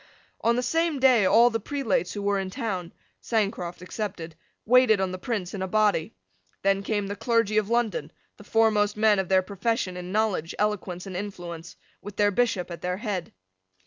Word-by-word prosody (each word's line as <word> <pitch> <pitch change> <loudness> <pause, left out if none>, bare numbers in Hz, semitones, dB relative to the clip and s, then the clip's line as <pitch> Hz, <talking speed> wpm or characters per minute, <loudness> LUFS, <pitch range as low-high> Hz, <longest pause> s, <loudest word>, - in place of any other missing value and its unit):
On 235 +1 +3
the 250 - 0
same 325 +3 +1
day 250 -7 +5
all 235 +4 +6
the 225 - -1
prelates 225 -7 -1
who 205 - -5
were 200 -1 +1
in 190 -1 -3
town, 185 -4 -4 0.3
Sancroft 195 -6 -2
excepted, 180 -5 -5 0.3
waited 245 -3 +5
on 190 -1 0
the 185 - -6
Prince 195 -4 -3
in 195 - -4
a 190 - -1
body. 210 - +1 0.5
Then 195 0 +2
came 205 0 -1
the 200 +1 -4
clergy 215 -1 +2
of 210 -1 -4
London, 235 -2 0 0.3
the - - -13
foremost 210 -1 +2
men 210 -2 +4
of 190 - -2
their 190 -1 +4
profession 200 0 -2
in 180 0 -6
knowledge, 200 -6 0
eloquence, 200 -4 -2
and 190 -2 -7
influence, 175 -4 -6 0.3
with 205 0 -9
their 205 0 +3
bishop 200 -5 0
at 170 - -7
their 180 0 -2
head. 200 -5 -4
205 Hz, 185 wpm, -26 LUFS, 185-225 Hz, 0.5 s, all